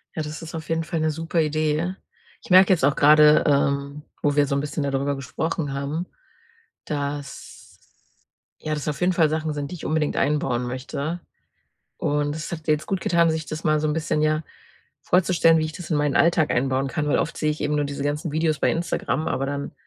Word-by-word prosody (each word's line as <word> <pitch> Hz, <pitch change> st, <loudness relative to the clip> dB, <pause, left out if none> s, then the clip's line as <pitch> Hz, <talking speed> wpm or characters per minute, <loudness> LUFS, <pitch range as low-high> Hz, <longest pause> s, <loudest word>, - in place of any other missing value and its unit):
Ja, 160 Hz, -, -2 dB
das 150 Hz, +1 st, -7 dB
ist 165 Hz, 0 st, -8 dB
auf 160 Hz, 0 st, -7 dB
jeden 165 Hz, 0 st, 0 dB
Fall 165 Hz, 0 st, -3 dB
'ne 155 Hz, 0 st, +1 dB
super 165 Hz, +2 st, -2 dB
Idee. 155 Hz, +3 st, 0 dB, 0.5 s
Ich -, -, -15 dB
merke 190 Hz, +1 st, +7 dB
jetzt 170 Hz, -, -1 dB
auch 140 Hz, 0 st, +2 dB
gerade, 150 Hz, +1 st, +6 dB
ähm, 140 Hz, 0 st, +1 dB, 0.2 s
wo 145 Hz, -1 st, +2 dB
wir 145 Hz, -1 st, +3 dB
so 140 Hz, -, -1 dB
'n -, -, +1 dB
bisschen 145 Hz, 0 st, -3 dB
da 140 Hz, -, -1 dB
drüber 140 Hz, +1 st, -1 dB
gesprochen 145 Hz, +3 st, -3 dB
haben, 140 Hz, +5 st, -3 dB, 0.8 s
dass 145 Hz, -1 st, -5 dB, 1.1 s
ja, 155 Hz, -, -3 dB
das 150 Hz, -1 st, -4 dB
auf 150 Hz, -2 st, -2 dB
jeden 180 Hz, +1 st, +3 dB
Fall 165 Hz, -3 st, +3 dB
Sachen 155 Hz, 0 st, -2 dB
sind, 145 Hz, -1 st, -4 dB
die -, -, -5 dB
ich 170 Hz, -, -9 dB
unbedingt 155 Hz, -1 st, 0 dB
einbauen 135 Hz, -4 st, 0 dB
möchte, 140 Hz, +6 st, -4 dB, 0.8 s
und 145 Hz, 0 st, 0 dB
es 155 Hz, +1 st, -6 dB
hat 160 Hz, -2 st, -6 dB
mir 155 Hz, -, +4 dB
jetzt 150 Hz, -, -6 dB
gutgetan, 170 Hz, -3 st, +2 dB
sich 160 Hz, -1 st, -3 dB
das 155 Hz, +1 st, -6 dB
mal 155 Hz, -1 st, +2 dB
so 155 Hz, -, 0 dB
'n -, -, +1 dB
bisschen, 155 Hz, -1 st, -1 dB
ja, 155 Hz, 0 st, +1 dB, 0.6 s
vorzustellen, 170 Hz, -2 st, +3 dB
wie 155 Hz, -, 0 dB
ich 155 Hz, -, -4 dB
das 175 Hz, +1 st, -9 dB
in 155 Hz, -, +2 dB
meinen 145 Hz, -1 st, +1 dB
Alltag 170 Hz, -2 st, +3 dB
einbauen 135 Hz, +1 st, 0 dB
kann, 150 Hz, +2 st, -2 dB
weil 145 Hz, -, +2 dB
oft 165 Hz, -, -2 dB
sehe 155 Hz, -, 0 dB
ich 150 Hz, -, -4 dB
eben 150 Hz, 0 st, 0 dB
nur 145 Hz, -, +1 dB
diese 140 Hz, 0 st, -4 dB
ganzen 145 Hz, +2 st, -2 dB
Videos 155 Hz, -1 st, 0 dB
bei -, -, +2 dB
Instagram, 165 Hz, -1 st, -1 dB
aber 135 Hz, -, -1 dB
dann 140 Hz, 0 st, -4 dB
150 Hz, 215 wpm, -23 LUFS, 145-160 Hz, 1.1 s, merke